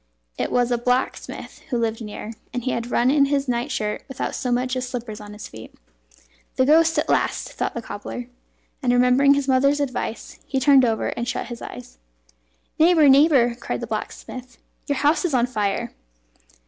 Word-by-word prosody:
It - - -2
was 245 0 +2
a 240 - +1
blacksmith 250 +2 -2
who 245 - 0
lived 230 0 -1
near, 210 +1 -7 0.2
and 245 -1 -4
he 255 - -1
had 235 +1 -3
run 245 +1 +3
in 300 - +2
in 280 - +6
his 280 0 0
night 245 +2 -1
shirt 210 -5 -2
without 265 -2 -4
so 250 - -2
much 250 +1 0
as 255 -1 -3
slippers 235 -4 -6
on 205 0 -10
his 210 - -8
feet. 110 0 -12 0.8
"The 260 - +3
ghost 320 +3 +4
at - - +1
last!" - - 0
thought - - -3
the 235 - -4
cobbler, 230 +4 -6 0.6
and, 250 -3 +2
remembering 250 +3 +5
his 280 -1 -1
mother's 275 +2 +3
advice, 255 -5 -4
he 270 - 0
turned 275 0 +6
over 225 -2 0
and 235 - -4
shut 250 -2 -3
his 240 -1 -7
eyes. 90 - -10 0.8
"Neighbour! 320 -2 +6
neighbour!" 270 -4 +5
cried 235 - -5
the - - -3
blacksmith, 255 -1 -6 0.3
"your 285 -2 0
house 295 +7 +2
is 335 -7 0
on 240 -1 +3
fire!" 220 -1 -2
250 Hz, 190 wpm, -23 LUFS, 235-275 Hz, 0.8 s, in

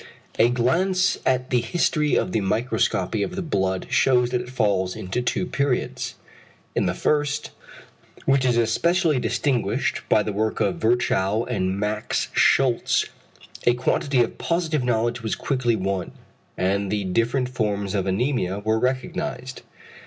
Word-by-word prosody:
A 115 - +6
glance 180 +11 +1
at 130 0 +1
the 125 -1 +3
history 150 +3 +1
of - - 0
the 110 - 0
microscopy 110 -1 0
of 180 - -2
the 190 - -3
blood 95 - -1
shews 125 -2 +3
that 125 -1 0
it 125 - -9
falls 100 -7 0
into 95 +7 -3
two 125 +8 -1
periods. 140 -6 -2 0.6
In - - +1
the - - -1
first, 145 -1 0 0.7
which 135 -1 +3
is 125 -2 +2
especially 155 +7 +2
distinguished 125 -2 0
by 105 - +4
the 105 - -3
work 110 +2 -1
of 100 - +1
Virchow 110 -2 +1
and 95 -5 -1
Max 105 +1 -1
Schultze, 130 -3 +3 0.6
a 120 - +5
quantity 125 +1 +1
of 115 - -6
positive 165 -5 0
knowledge 120 0 0
was 110 -1 -2
quickly 125 -4 0
won, 95 -2 -2 0.4
and 100 +1 0
the 105 -1 0
different 115 +7 0
forms 105 -5 -2
of 95 -2 0
anæmia 100 -1 -1
were 110 +1 +2
recognised. 130 +2 -3
120 Hz, 145 wpm, -23 LUFS, 105-130 Hz, 0.7 s, A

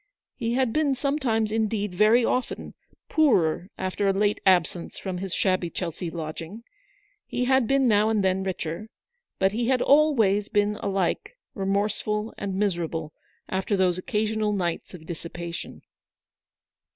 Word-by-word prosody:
He 235 -1 -1
had 255 -3 +1
been 300 -3 +2
some 280 +3 -1
times, 225 -5 +1
indeed, 215 -3 -1
very 215 +5 +5
often, 255 - -2 0.3
poorer 185 - +2
after 190 +2 -1
a 195 - +3
late 205 +1 +1
absence 175 -2 +2
from 185 -2 -4
his 190 0 -5
shabby 185 -2 +1
Chelsea 170 0 -4
lodging; 165 +6 -6 0.6
he 250 - -1
had 260 -2 +3
been 270 0 +3
now 215 -1 +4
and 215 -3 +1
then 190 0 +2
richer; 190 +2 -4 0.5
but 190 0 +3
he 230 +3 -1
had 260 -1 +3
always 230 -10 +4
been 210 -1 +1
alike 195 - -1 0.2
remorseful 210 +2 -1
and 195 -2 -3
miserable 170 -5 -1 0.3
after 190 +2 -1
those 185 -1 +2
occasional 215 0 0
nights 180 -2 -2
of 160 -3 -12
dissipation. 170 +1 -7
205 Hz, 140 wpm, -26 LUFS, 185-225 Hz, 0.6 s, very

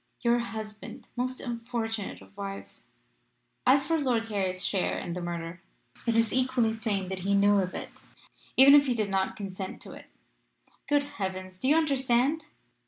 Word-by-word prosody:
"'Your 240 0 +3
husband 220 -2 -7
most 255 +1 -2
unfortunate 230 -3 -4
of - - -20
wives! 195 -1 -7 0.8
As 275 +2 +5
for 330 -1 +1
Lord 245 -5 +1
Harry's 190 -3 0
share 190 -3 0
in 170 - -4
the 180 - -4
murder, 170 0 -5 0.5
it 230 - +2
is 230 -1 +3
equally 255 -3 +2
plain 210 -4 -2
that 190 -1 -3
he 200 +2 +1
knew 200 0 +5
of 185 -1 -2
it, - - -5 0.7
even 270 +2 +9
if 290 -1 +7
he 250 - +1
did 210 -3 -1
not 190 0 0
consent 190 -1 -6
to - - -9
it. - - -12 0.8
Good 290 -1 +4
heavens! 185 -6 -5
Do 260 - -1
you 295 - +5
understand? 275 0 +2
220 Hz, 170 wpm, -28 LUFS, 195-255 Hz, 0.8 s, even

